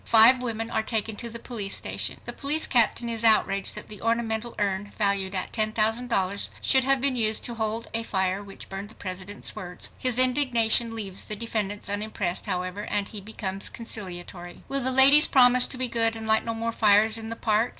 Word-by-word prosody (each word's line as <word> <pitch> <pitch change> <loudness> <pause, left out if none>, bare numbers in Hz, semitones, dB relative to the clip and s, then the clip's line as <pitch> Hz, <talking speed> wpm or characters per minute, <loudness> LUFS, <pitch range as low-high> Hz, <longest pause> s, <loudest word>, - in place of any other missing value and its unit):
Five 235 +3 +6
women 225 -2 -4
are - - -1
taken 220 -1 -3
to 235 - -5
the 230 - -6
police 225 -4 -1
station. - - -1
The - - -6
police 300 +3 +1
captain 235 -1 +1
is 230 -1 -4
outraged 210 -3 +3
that - - -8
the 210 -2 -11
ornamental 230 0 -2
urn 205 0 -3
valued 200 -2 0
at 185 - -3
$10,000 215 -2 -1
should 265 -1 +3
have 270 +1 +1
been 270 0 0
used 220 -2 +2
to 240 - -1
hold 225 0 -3
a 230 - 0
fire 190 -2 -2
which 195 -1 -9
burned 195 +2 -8
the 220 - -12
President's 190 +2 -5
words! 180 -1 -2
His 250 -2 +2
indignation 240 -3 +4
leaves 195 -4 -3
the 210 - -1
defendants 210 -2 -4
unimpressed, 205 -2 -3
however, 185 +2 -4
and 200 -1 -3
he 210 - -6
becomes 195 -2 -5
conciliatory. 180 -5 -6
Will 275 0 -1
the 260 - -1
"ladies 270 +3 +6
promise 250 -1 +5
to - - -3
be 255 0 +2
good 230 -1 +3
and 225 0 -7
light 220 0 +2
no 230 -1 -4
more 230 +1 -3
fires 215 0 +2
in 225 0 -8
the 230 - -5
park?" 220 +1 0
220 Hz, 200 wpm, -24 LUFS, 200-235 Hz, -, Five